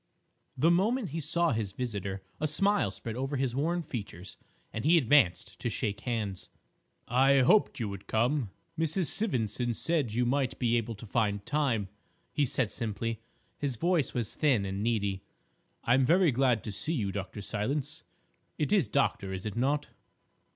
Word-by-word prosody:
The 160 +6 +4
moment 215 +6 +2
he 165 - -3
saw 170 +2 +1
his 110 -4 -2
visitor 100 -5 -4 0.2
a 155 - +1
smile 200 +7 +3
spread 115 -1 -6
over 135 +3 -2
his 130 -2 -1
worn 170 +5 0
features, 100 - -7 0.4
and 110 - -3
he 165 +4 +5
advanced 135 - +3
to - - -1
shake 105 -1 -2
hands. 110 -6 -3 0.6
"I 135 +2 +4
hoped 205 +8 +4
you 115 - -1
would 100 -1 -8
come; 120 +1 +1 0.3
Mrs. 165 +2 0
Sivendson 120 - -1
said 155 -7 0
you 125 +1 +2
might 130 0 0
be 120 -2 +1
able 115 -1 -1
to 105 - -10
find 105 -2 0
time," 130 -9 0 0.5
he 145 -2 +2
said 120 -3 -1
simply. 115 -1 -3 0.4
His 140 -4 -1
voice 170 +2 +1
was 115 -4 -2
thin 130 -10 +2
and 95 +1 -3
needy. 100 -4 0 0.6
"I 120 - +3
am 135 +1 +4
very 175 0 +5
glad 125 -3 +2
to 110 - -4
see 155 - -1
you, 105 -8 -1
Dr. 100 +1 -5
Silence. 125 +8 -2 0.6
It 150 +7 0
is 190 - +3
'Doctor,' 95 -2 0
is 95 +1 -5
it 105 - -4
not?" 140 +5 0
125 Hz, 170 wpm, -30 LUFS, 105-150 Hz, 0.6 s, he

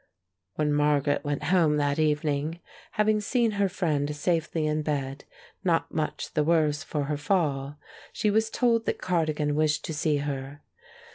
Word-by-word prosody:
When 150 -1 +1
Margaret 145 -1 +2
went 145 -1 -2
home 160 -3 +3
that 145 0 0
evening, 150 +1 0 0.3
having 215 0 +2
seen 230 +2 +1
her 200 -1 +1
friend 150 -5 -1
safely 160 0 0
in 155 0 0
bed, 140 -2 -3 0.4
not 170 -4 +1
much 155 -1 -3
the 150 - +2
worse 155 -2 +2
for 150 -2 -3
her 145 +1 -2
fall, 145 -4 0 0.3
she 210 - 0
was 220 +1 +2
told 230 -1 +1
that - - 0
Cardigan 155 -4 0
wished 155 0 +1
to 160 - -4
see 150 0 +1
her. 140 0 -4
150 Hz, 155 wpm, -27 LUFS, 145-170 Hz, 0.4 s, home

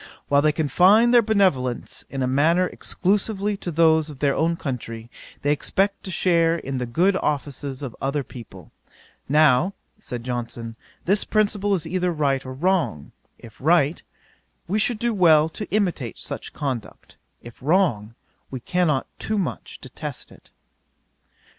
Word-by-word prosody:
"While 140 0 +4
they 155 +1 +3
confine 185 +10 +4
their 240 -1 +7
benevolence, 185 - 0
in 135 -1 -3
a - - +1
manner, 160 +7 +3
exclusively 200 +3 -1
to 180 - -5
those 160 -1 +3
of 145 - -10
their 140 0 +1
own 165 +3 +1
country, 120 -6 -6 0.3
they 145 - +2
expect 195 +7 0
to - - -5
share 170 -2 +2
in 135 -5 -4
the 125 - -3
good 180 +11 +2
offices 140 -2 -3
of 130 -4 -6
other 140 +1 -1
people. 100 -10 -12 0.6
Now 150 +5 +4 0.2
(said 120 -1 -6
Johnson,) 120 -2 -5 0.3
this 200 +3 +2
principle 205 -1 +1
is 170 - -2
either 180 +2 -1
right 140 -4 0
or 130 - -7
wrong; 165 - -1 0.3
if 115 -2 -14
right, 155 0 +3 0.7
we 205 +5 0
should 230 +1 +1
do 235 +1 0
well 160 -5 +5
to 210 +6 -7
imitate 175 - -1
such - - -7
conduct; 130 -7 -6 0.3
if 120 +1 -13
wrong, 130 - +1 0.3
we 130 - -5
cannot 155 -1 0
too 215 - -2
much 190 -5 -4
detest - - -8
it." - - -18
155 Hz, 150 wpm, -23 LUFS, 130-185 Hz, 0.7 s, their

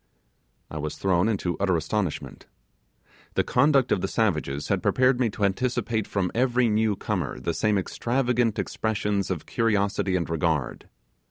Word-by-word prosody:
I 80 - -5
was 75 0 -4
thrown 95 +2 +2
into 95 -5 -1
utter 95 -3 +2
astonishment. 85 +2 -3 0.9
The - - +3
conduct 140 -4 +3
of 90 - +2
the 95 - -1
savages 75 -10 -1
had - - +1
prepared 130 0 +3
me 120 -3 +2
to 100 0 -1
anticipate 110 +1 -1
from 95 -3 -1
every 125 -1 +2
newcomer 105 -10 -1
the 85 +7 -2
same 105 +6 +1
extravagant 120 +2 0
expressions 105 -2 -1
of 90 -5 -3
curiosity 100 -4 0
and 85 -3 0
regard. 80 -3 -1
100 Hz, 145 wpm, -25 LUFS, 90-115 Hz, 0.9 s, The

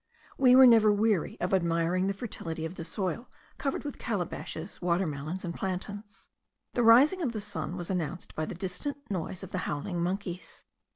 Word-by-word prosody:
We 255 -2 +6
were 260 0 +10
never 225 -3 +7
weary 205 -4 +1
of 180 +2 -1
admiring 170 +1 +2
the 195 - -1
fertility 165 -8 -5
of 165 - -5
the 175 - -6
soil, 185 +6 -3 0.3
covered 275 -2 -2
with 290 -2 -6
calabashes, 180 -4 -4
water 175 +1 +2
melons, 155 +5 -4
and 170 - -3
plantains. 200 +3 -5 0.5
The 245 - +1
rising 260 +11 +6
of 260 -8 -1
the 215 - -3
sun 175 -3 -4
was 175 +1 -4
announced 175 -2 -3
by 155 - -2
the - - -5
distant 190 - -4
noise 185 0 -3
of 190 - -8
the 185 - -2
howling 170 +4 -2
monkeys. 180 -1 -4
185 Hz, 180 wpm, -29 LUFS, 170-215 Hz, 0.5 s, were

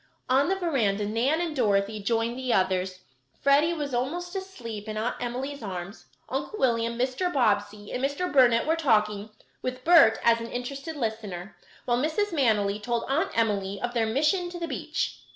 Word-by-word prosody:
On 270 +5 +3
the 385 - +2
veranda 235 - 0
Nan 240 +9 +1
and 330 -3 -2
Dorothy 210 -3 +1
joined 230 +3 0
the 255 -1 -2
others. 185 -2 0 0.4
Freddie 285 +4 +4
was 290 -4 -4
almost 345 +10 -2
asleep 230 - -6
in 215 - -4
Aunt 225 +3 -1
Emily's 255 +3 -4
arms; 190 -1 -6 0.2
Uncle 430 - -4
William, 235 - +1
Mr. 255 +9 0
Bobbsey, 205 -5 0
and 250 - -3
Mr. 285 +5 -1
Burnet 245 -4 +5
were 320 +2 +2
talking, 215 -8 +1 0.3
with 255 0 -4
Bert 325 -9 +7
as 230 0 +4
an 230 - -5
interested 275 +6 -5
listener; 215 -7 -4 0.3
while 240 0 +1
Mrs. 350 +8 0
Manily 210 -8 +2
told 235 +1 -1
Aunt 280 +5 +1
Emily 200 -3 0
of 245 +3 -3
her 230 -2 +1
mission 305 - +1
to 350 - -7
the 335 - -3
beach. - - -3
240 Hz, 170 wpm, -27 LUFS, 215-285 Hz, 0.4 s, Bert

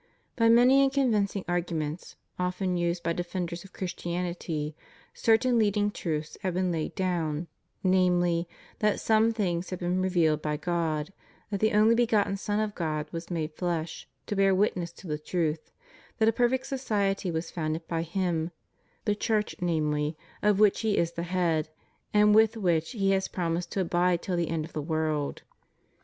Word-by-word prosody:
By 230 -1 +4
many 250 +4 +6
and 270 -1 +3
convincing 215 -8 +1
arguments, 170 -2 -3 0.2
often 180 0 -1
used 175 0 -1
by 170 - 0
defenders 175 0 -4
of 195 - -14
Christianity, 175 -4 -3 0.4
certain 235 +2 +3
leading 205 -1 +2
truths 155 -5 -4
have 185 -2 -2
been 185 -1 +1
laid 160 -2 -3
down: 170 -4 -1 0.4
namely, 175 -2 +2 0.3
that 210 -1 +2
some 220 +1 +3
things 180 -5 -1
have 185 - -3
been 180 +1 0
revealed 170 -5 +2
by 150 -1 -1
God; 160 0 -1 0.4
that 200 - -1
the 215 +1 +2
only 215 +2 +5
begotten 225 -4 +2
Son 205 +1 -1
of 215 -1 -1
God 155 -4 -2
was 165 0 -6
made 160 -3 -2
flesh, 170 -1 -3 0.2
to 205 - -3
bear 195 -1 +4
witness 185 -3 0
to - - -14
the 150 -3 -3
truth; 160 -1 -2 0.5
that 220 - +3
a 225 - +4
perfect 250 +3 +1
society 205 -8 -1
was 165 0 -3
founded 160 0 -3
by 165 -1 -1
Him 170 -1 -1 0.3
— - - -40
the 210 - +2
Church 210 0 0
namely, 155 -3 0 0.2
of 210 -1 +3
which 210 -2 +5
He 220 -3 +1
is 170 0 +1
the 170 - -5
head, 165 -4 +1 0.4
and 210 0 +5
with 220 +1 +5
which 175 -2 +1
He 195 -4 +1
has 190 0 +1
promised 170 -1 -2
to 195 - 0
abide 175 0 +1
till 185 - -1
the 170 -2 0
end 160 -1 -1
of 160 - -14
the 155 - -2
world. 155 -1 -1
180 Hz, 175 wpm, -28 LUFS, 165-205 Hz, 0.5 s, many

